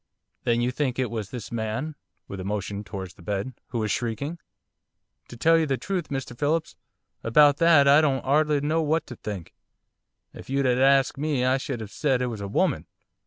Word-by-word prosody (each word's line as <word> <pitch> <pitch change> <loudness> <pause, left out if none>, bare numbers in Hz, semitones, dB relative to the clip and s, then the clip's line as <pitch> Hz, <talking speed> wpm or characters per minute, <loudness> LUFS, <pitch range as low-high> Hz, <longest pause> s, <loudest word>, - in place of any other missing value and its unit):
'Then 120 0 +2
you 125 +1 +1
think 130 -1 -1
it 130 -3 -1
was 110 -4 -4
this 115 -6 -7
man' 115 +7 -3 0.3
with 100 - -7
a - - -4
motion 100 +1 -3
towards 95 -1 -7
the - - -18
bed 100 +7 -3
'who 120 - -4
was 110 -2 -1
shrieking?' 135 - -3 0.9
'To 120 - -11
tell 165 +8 +4
you 160 - +1
the 135 -2 0
truth, 185 -1 -3
Mr 135 -3 -4
Phillips, 155 +5 -1 0.5
about 145 +5 +5
that 165 -4 +5
I 145 +2 +7
don't 135 -4 +1
'ardly 150 +1 +2
know 155 +3 +1
what 160 +1 0
to 120 - -9
think. 100 -6 -7 0.8
If - - -12
you 135 +1 +1
'ad 125 0 +2
asked 135 +1 +4
me 145 -4 0
I 130 +1 +3
should 125 -4 -4
'ave 105 - -10
said 135 0 +1
it 125 - 0
was 105 - -7
a 100 - -4
woman. 100 - 0
130 Hz, 205 wpm, -25 LUFS, 110-145 Hz, 0.9 s, I